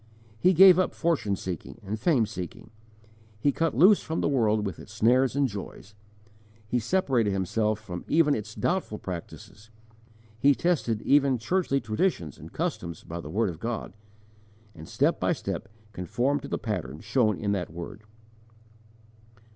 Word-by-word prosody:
He 185 Hz, +8 st, +4 dB
gave 185 Hz, +1 st, +8 dB
up 185 Hz, -, 0 dB
fortune 160 Hz, -12 st, 0 dB
seeking 90 Hz, +2 st, -6 dB
and 105 Hz, +3 st, -4 dB
fame 130 Hz, -3 st, +3 dB
seeking; 95 Hz, -3 st, -8 dB, 0.7 s
he 140 Hz, -, +2 dB
cut 165 Hz, -1 st, -1 dB
loose 190 Hz, +7 st, +6 dB
from 160 Hz, +1 st, -3 dB
the -, -, +1 dB
world 110 Hz, -6 st, +2 dB
with 95 Hz, -5 st, -5 dB
its -, -, -12 dB
snares 125 Hz, +5 st, +3 dB
and 140 Hz, -1 st, +3 dB
joys; 100 Hz, -1 st, -8 dB, 0.7 s
he 125 Hz, +3 st, 0 dB
separated 125 Hz, -, +1 dB
himself 105 Hz, +3 st, 0 dB
from 90 Hz, -5 st, -7 dB
even 155 Hz, -2 st, +4 dB
its 105 Hz, -2 st, -5 dB
doubtful 175 Hz, -, -1 dB
practices, 95 Hz, +4 st, -9 dB, 0.7 s
he 140 Hz, +4 st, +5 dB
tested 135 Hz, -11 st, 0 dB
even 140 Hz, -2 st, +4 dB
churchly 140 Hz, +3 st, 0 dB
traditions 110 Hz, -, -1 dB
and -, -, -11 dB
customs 85 Hz, -2 st, -4 dB
by 85 Hz, +1 st, -6 dB
the 75 Hz, -, -9 dB
word 105 Hz, +3 st, 0 dB
of 80 Hz, -, -11 dB
God, 115 Hz, 0 st, -4 dB, 0.8 s
and 80 Hz, -3 st, -11 dB
step -, -, +1 dB
by -, -, +2 dB
step -, -, -5 dB, 0.3 s
conformed 120 Hz, +10 st, -1 dB
to 140 Hz, -, -7 dB
the -, -, -2 dB
pattern 85 Hz, -, -4 dB
showed 110 Hz, -7 st, +1 dB
in 100 Hz, -1 st, -1 dB
that 95 Hz, -3 st, -2 dB
word. 90 Hz, +5 st, -8 dB
110 Hz, 155 wpm, -27 LUFS, 100-140 Hz, 0.8 s, gave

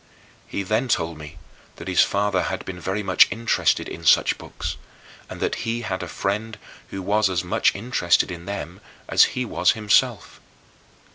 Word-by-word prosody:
He 100 Hz, -, -3 dB
then 110 Hz, +6 st, 0 dB
told 85 Hz, -9 st, -1 dB
me 75 Hz, +2 st, -10 dB, 0.4 s
that 85 Hz, -, -10 dB
his 90 Hz, -2 st, +4 dB
father 100 Hz, -1 st, +1 dB
had 95 Hz, -, -4 dB
been 90 Hz, -1 st, -7 dB
very 95 Hz, +4 st, -3 dB
much -, -, +5 dB
interested 115 Hz, 0 st, +1 dB
in 85 Hz, -, -8 dB
such 80 Hz, -, +4 dB
books, -, -, -6 dB, 0.5 s
and -, -, -8 dB
that -, -, -1 dB
he 115 Hz, +1 st, -2 dB
had 95 Hz, -5 st, -3 dB
a 90 Hz, -, -5 dB
friend 110 Hz, +5 st, -3 dB, 0.3 s
who 95 Hz, -1 st, -6 dB
was 105 Hz, +1 st, +2 dB
as 90 Hz, -2 st, -1 dB
much 90 Hz, -, +1 dB
interested 95 Hz, -5 st, +1 dB
in 85 Hz, -1 st, -8 dB
them 95 Hz, -3 st, -6 dB, 0.3 s
as -, -, +4 dB
he 125 Hz, -, 0 dB
was 90 Hz, -5 st, +2 dB
himself. 105 Hz, -3 st, +1 dB
95 Hz, 170 wpm, -23 LUFS, 90-110 Hz, 0.5 s, much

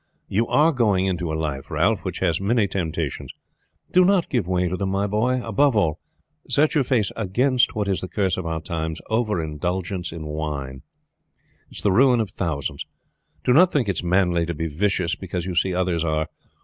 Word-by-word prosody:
You 115 Hz, +4 st, 0 dB
are 155 Hz, +3 st, +4 dB
going 105 Hz, -, +2 dB
into 90 Hz, -3 st, -1 dB
a -, -, -1 dB
life, 75 Hz, -4 st, -4 dB
Ralph, 95 Hz, +8 st, +1 dB
that 95 Hz, -, -3 dB
has 85 Hz, -2 st, +1 dB
many 105 Hz, +1 st, +2 dB
temptations. 90 Hz, -5 st, -3 dB, 0.6 s
Do 185 Hz, -, +6 dB
not 185 Hz, -1 st, +2 dB
give 120 Hz, -9 st, 0 dB
way 90 Hz, -1 st, +1 dB
to 90 Hz, -, -2 dB
them, 95 Hz, +1 st, -2 dB
my 100 Hz, +1 st, 0 dB
boy. 115 Hz, +5 st, +1 dB
Above 125 Hz, +4 st, +2 dB
all, 80 Hz, -7 st, +1 dB, 0.5 s
set 150 Hz, +2 st, +3 dB
your 150 Hz, -, +3 dB
face 120 Hz, -6 st, +1 dB
against 125 Hz, +5 st, +1 dB
what 105 Hz, -2 st, -1 dB
is 95 Hz, -2 st, 0 dB
the 95 Hz, -, -4 dB
curse 95 Hz, -1 st, 0 dB
of 90 Hz, -3 st, -4 dB
our 80 Hz, -1 st, -2 dB
times: 80 Hz, 0 st, -4 dB
over 110 Hz, -4 st, +1 dB
indulgence 90 Hz, +4 st, -3 dB
in 80 Hz, -1 st, -7 dB
wine. 75 Hz, -4 st, -4 dB, 0.9 s
It -, -, -12 dB
is -, -, -6 dB
the 100 Hz, -, +3 dB
ruin 125 Hz, +4 st, +5 dB
of 110 Hz, -5 st, -2 dB
thousands. 80 Hz, -9 st, -3 dB, 0.6 s
Do 125 Hz, -, +3 dB
not 180 Hz, +6 st, +6 dB
think 130 Hz, -7 st, +1 dB
it 95 Hz, -, -1 dB
is -, -, -2 dB
manly 90 Hz, -2 st, +2 dB
to 85 Hz, -, -3 dB
be 80 Hz, +2 st, -3 dB
vicious 85 Hz, +2 st, 0 dB
because 90 Hz, -2 st, -5 dB
you 95 Hz, -, -3 dB
see 90 Hz, +2 st, +1 dB
others 90 Hz, -2 st, 0 dB
are. 80 Hz, -1 st, 0 dB
95 Hz, 200 wpm, -23 LUFS, 85-110 Hz, 0.9 s, Do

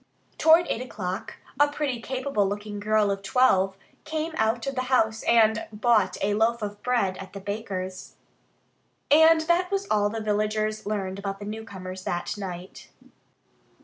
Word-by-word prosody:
Toward 325 Hz, +2 st, +6 dB
eight 230 Hz, -, -2 dB
o'clock 210 Hz, -3 st, -5 dB, 0.2 s
a 290 Hz, -, +6 dB
pretty, 290 Hz, -5 st, -3 dB
capable 260 Hz, -6 st, -1 dB
looking 205 Hz, 0 st, -5 dB
girl 210 Hz, 0 st, +2 dB
of 195 Hz, 0 st, -3 dB
twelve 195 Hz, -3 st, +3 dB, 0.3 s
came 315 Hz, +1 st, -3 dB
out 225 Hz, +1 st, 0 dB
of 275 Hz, -, -2 dB
the 255 Hz, -1 st, -2 dB
house 220 Hz, -4 st, +2 dB
and 220 Hz, -1 st, +3 dB
bought 215 Hz, -2 st, +2 dB
a 205 Hz, +1 st, +1 dB
loaf 225 Hz, +2 st, +1 dB
of 205 Hz, 0 st, -5 dB
bread 230 Hz, -7 st, 0 dB
at 190 Hz, -, -10 dB
the 200 Hz, -, -6 dB
baker's. 190 Hz, -2 st, -5 dB, 1.0 s
And 320 Hz, +2 st, +7 dB
that 345 Hz, +3 st, +1 dB
was 395 Hz, 0 st, -1 dB
all 205 Hz, -1 st, +3 dB
the 225 Hz, +2 st, -4 dB
villagers 215 Hz, 0 st, -1 dB
learned 195 Hz, -2 st, -3 dB
about 195 Hz, 0 st, -4 dB
the 205 Hz, -, -8 dB
newcomers 190 Hz, -4 st, -7 dB
that 175 Hz, +4 st, -2 dB
night. 185 Hz, -2 st, -8 dB
215 Hz, 155 wpm, -26 LUFS, 200-250 Hz, 1.0 s, And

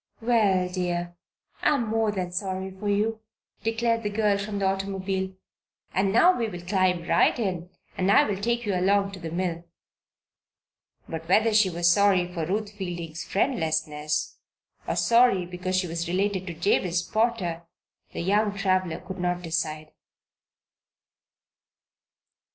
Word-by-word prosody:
"Well, 210 Hz, -6 st, +2 dB
dear, 175 Hz, -1 st, -3 dB, 0.5 s
I -, -, +3 dB
am 240 Hz, -4 st, -1 dB
more 220 Hz, -1 st, +1 dB
than 185 Hz, -3 st, -3 dB
sorry 190 Hz, +1 st, -3 dB
for 195 Hz, +2 st, -5 dB
you," 215 Hz, +2 st, 0 dB, 0.4 s
declared 230 Hz, +1 st, 0 dB
the 210 Hz, -, -2 dB
girl 205 Hz, -1 st, +2 dB
from 205 Hz, 0 st, -4 dB
the 200 Hz, -, 0 dB
automobile. 190 Hz, 0 st, -2 dB, 0.6 s
"And 190 Hz, +1 st, +1 dB
now 350 Hz, -, +5 dB
we 230 Hz, -, -1 dB
will 175 Hz, -3 st, -8 dB
climb 185 Hz, -2 st, +1 dB
right -, -, +3 dB
in 180 Hz, -6 st, -3 dB, 0.3 s
and 185 Hz, +1 st, 0 dB
I'll 205 Hz, 0 st, +4 dB
take 235 Hz, +3 st, -1 dB
you 205 Hz, -, 0 dB
along 195 Hz, +2 st, +2 dB
to 195 Hz, -, -9 dB
the 165 Hz, -2 st, -5 dB
mill." 170 Hz, 0 st, -2 dB, 1.4 s
But 165 Hz, 0 st, -6 dB
whether 220 Hz, +4 st, +4 dB
she 210 Hz, -3 st, +5 dB
was 170 Hz, 0 st, 0 dB
sorry 180 Hz, -1 st, +3 dB
for 165 Hz, -3 st, -3 dB
Ruth 205 Hz, +2 st, -2 dB
Fielding's 175 Hz, -5 st, -6 dB
friendlessness, 155 Hz, -, -1 dB, 0.5 s
or -, -, -1 dB
sorry 235 Hz, -6 st, +4 dB
because 180 Hz, +1 st, -3 dB
she 185 Hz, 0 st, +1 dB
was 170 Hz, 0 st, -3 dB
related 190 Hz, +1 st, -1 dB
to 170 Hz, -, -5 dB
Jabez 175 Hz, 0 st, +1 dB
Potter, 185 Hz, -6 st, -1 dB, 0.4 s
the -, -, -4 dB
young 205 Hz, +3 st, +1 dB
traveler 185 Hz, -4 st, 0 dB
could 185 Hz, +1 st, -8 dB
not 180 Hz, 0 st, -1 dB
decide. 155 Hz, -2 st, -3 dB
190 Hz, 145 wpm, -26 LUFS, 175-205 Hz, 1.4 s, now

